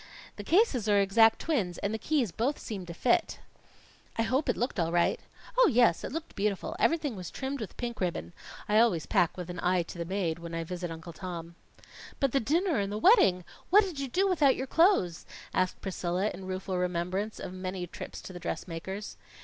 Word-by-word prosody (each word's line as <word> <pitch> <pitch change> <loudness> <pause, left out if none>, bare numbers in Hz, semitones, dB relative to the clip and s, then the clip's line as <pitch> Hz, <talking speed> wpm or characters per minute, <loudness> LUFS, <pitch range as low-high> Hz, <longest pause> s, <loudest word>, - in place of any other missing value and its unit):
The - - -6
cases 305 - +3
are 205 -1 +5
exact 225 +3 +5
twins, 215 - -1
and 200 - -2
the 220 - -2
keys 270 - 0
both 240 - -1
seem 195 -6 -6
to 170 - -6
fit." 240 +6 +1 0.8
"I 225 - +2
hope 260 +6 0
it - - +1
looked 245 -4 -1
all 165 -1 +1
right?" 175 0 +2 0.4
"Oh, - - +7
yes, 235 -8 +4
it - - -4
looked 325 +3 -6
beautiful. 200 -1 -1
Everything 310 -7 +1
was 180 -3 -6
trimmed 270 -1 -4
with 210 - -7
pink 235 -3 -4
ribbon. 85 - -2 0.3
I 210 +1 +4
always 190 -9 +3
pack 170 - +2
with 180 -2 -5
an 180 - -7
eye 180 -1 +2
to 170 - -10
the 170 - -2
maid, 170 -3 -1
when 170 0 -6
I 165 - -2
visit 175 +1 -5
Uncle 165 +1 -8
Tom." 170 -1 -7 0.7
"But 275 -2 +2
the 275 - +3
dinner 320 - +1
and 200 0 -1
the 210 - -2
wedding? 215 - +5 0.3
What 415 +4 +7
did 360 -8 -5
you 275 - -2
do 375 +10 +1
without 305 -8 +4
your 260 - -3
clothes?" 270 - +2 0.3
asked 185 0 0
Priscilla, 185 +1 -1
in 185 +1 -8
rueful 185 0 -3
remembrance 180 +4 -2
of 180 - -6
many 185 -1 -4
trips 175 - -8
to 185 - -9
the 175 - -7
dressmaker's. 180 +3 -5
195 Hz, 205 wpm, -29 LUFS, 175-255 Hz, 0.8 s, Oh